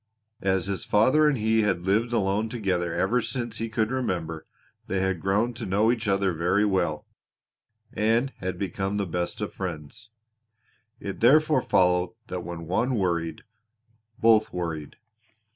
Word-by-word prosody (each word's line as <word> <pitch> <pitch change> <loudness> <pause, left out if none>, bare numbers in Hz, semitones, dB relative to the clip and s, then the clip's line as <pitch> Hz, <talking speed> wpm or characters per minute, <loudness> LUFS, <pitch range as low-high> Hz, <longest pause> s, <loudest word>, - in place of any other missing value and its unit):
As 95 -2 +1
his 95 -2 -3
father 130 +9 +4
and 145 -3 +2
he 110 0 +2
had 95 -5 0
lived 110 +6 +1
alone 105 0 +1
together 95 -7 -1
ever 125 +8 +1
since 120 -3 -4
he 115 0 -2
could 110 +1 0
remember 85 -11 -3 0.4
they 95 - -1
had 95 -3 -1
grown 105 +5 +1
to 120 0 -6
know 105 +4 +3
each 115 -2 -2
other 95 -2 +2
very 90 +6 +2
well, 95 -2 0 0.9
and 115 +5 +1
had 95 -1 -3
become 95 +1 -2
the 100 - 0
best 85 0 -3
of - - -3
friends. 90 - -6 0.9
It 100 - -6
therefore 150 +3 +5
followed 90 -2 +2
that 90 -1 -4
when 85 -1 -6
one 120 +9 0
worried, 85 -4 -1 0.8
both 110 -2 +4
worried. 80 -4 -4
100 Hz, 150 wpm, -26 LUFS, 90-115 Hz, 0.9 s, therefore